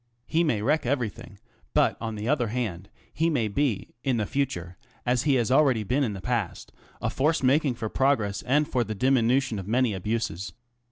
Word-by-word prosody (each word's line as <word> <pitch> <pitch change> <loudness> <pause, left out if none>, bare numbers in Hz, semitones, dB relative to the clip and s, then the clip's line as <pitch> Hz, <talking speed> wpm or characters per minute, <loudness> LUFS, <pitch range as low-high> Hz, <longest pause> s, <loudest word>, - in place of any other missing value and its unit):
He 165 +6 +1
may 115 -10 0
wreck 150 +6 +2
everything, 120 -4 -3 0.4
but - - +4
on 115 -1 -3
the 105 +1 -4
other 130 -4 +2
hand, 105 -5 -3 0.2
he 165 +2 +1
may 125 -9 +1
be 115 0 -1
in 130 -4 +1
the 105 - 0
future, 90 -10 -2 0.3
as 125 +1 +1
he 140 -3 +4
ha 120 - +2
been 120 - 0
already 135 -7 +4
in 130 -4 +1
the 95 - -7
past, 120 -6 -3 0.3
a - - 0
force 150 +2 +1
making 135 0 +3
for 115 -2 -4
progres 115 -5 +1
and 145 +3 +3
for 125 -1 +1
the 110 -1 -5
diminution 125 0 +2
of 95 - -7
many 120 0 +2
abuses. 100 -2 -3
120 Hz, 190 wpm, -26 LUFS, 105-135 Hz, 0.4 s, but